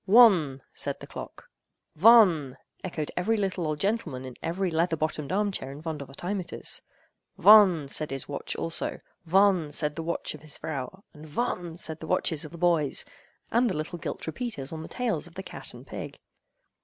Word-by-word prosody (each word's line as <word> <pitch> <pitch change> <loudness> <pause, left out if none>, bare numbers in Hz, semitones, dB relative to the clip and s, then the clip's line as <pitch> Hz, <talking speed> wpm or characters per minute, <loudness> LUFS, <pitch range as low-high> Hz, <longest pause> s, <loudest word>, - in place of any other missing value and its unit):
"One!" 185 - +6
said - - -4
the - - -9
clock. - - -9 0.5
"Von!" 180 - +6 0.3
echoed 160 -5 -3
every 220 +5 +1
little 190 -4 -1
old 155 -1 -2
gentleman 165 - -1
in 130 -2 -8
every 180 +2 -1
leather 165 +1 +1
bottomed 155 -2 -2
arm 205 +2 +1
chair 135 -8 -4
in 140 - -9
Vondervotteimittiss. 160 +5 -4 0.6
"Von!" 195 -8 +7
said 150 +2 0
his 135 -1 -5
watch 140 - -4
also; 165 0 -3 0.3
"von!" 185 -3 +4
said 150 0 -1
the 165 - -3
watch 170 +1 -2
of 155 - -11
his 155 -2 -8
vrow; 155 +6 -5
and 155 -1 -12
"von!" 170 -1 -2
said 160 -2 -3
the 160 - -8
watches 155 -1 +1
of 155 - -8
the 170 - -9
boys, 165 -5 +1 0.5
and 240 +1 +3
the 185 - -2
little 155 +3 -4
gilt - - -5
repeaters 160 - -4
on 160 - -5
the 160 - -7
tails 225 -11 -2
of 170 - -17
the 190 - -5
cat - - -8
and - - -12
pig. - - -7
165 Hz, 180 wpm, -28 LUFS, 150-190 Hz, 0.6 s, Von